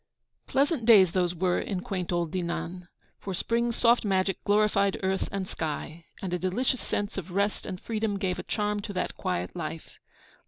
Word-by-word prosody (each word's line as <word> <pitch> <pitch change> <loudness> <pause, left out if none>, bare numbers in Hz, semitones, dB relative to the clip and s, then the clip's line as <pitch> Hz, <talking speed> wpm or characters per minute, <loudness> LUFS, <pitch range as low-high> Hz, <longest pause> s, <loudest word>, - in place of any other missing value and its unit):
Pleasant 275 -3 +1
days 195 -7 +8
those 180 -1 +1
were 180 +1 +1
in 185 -3 -3
quaint 185 -2 -3
old 170 -2 0
Dinan; 175 0 -3 0.3
for 195 -2 -4
spring's 235 +4 0
soft 235 +1 +4
magic 195 -2 +1
glorified 205 -1 +3
earth 190 0 0
and 195 -1 -2
sky, 160 +1 -4 0.2
and 185 -2 -2
a 180 - 0
delicious 235 +8 0
sense 205 -1 -2
of 185 -1 -8
rest 200 +3 0
and 185 - -5
freedom 215 -2 -1
gave 190 -2 -1
a - - -1
charm 210 -1 -1
to 205 0 -6
that 185 - -2
quiet 90 0 -2
life. - - -6
195 Hz, 180 wpm, -28 LUFS, 180-210 Hz, 0.3 s, days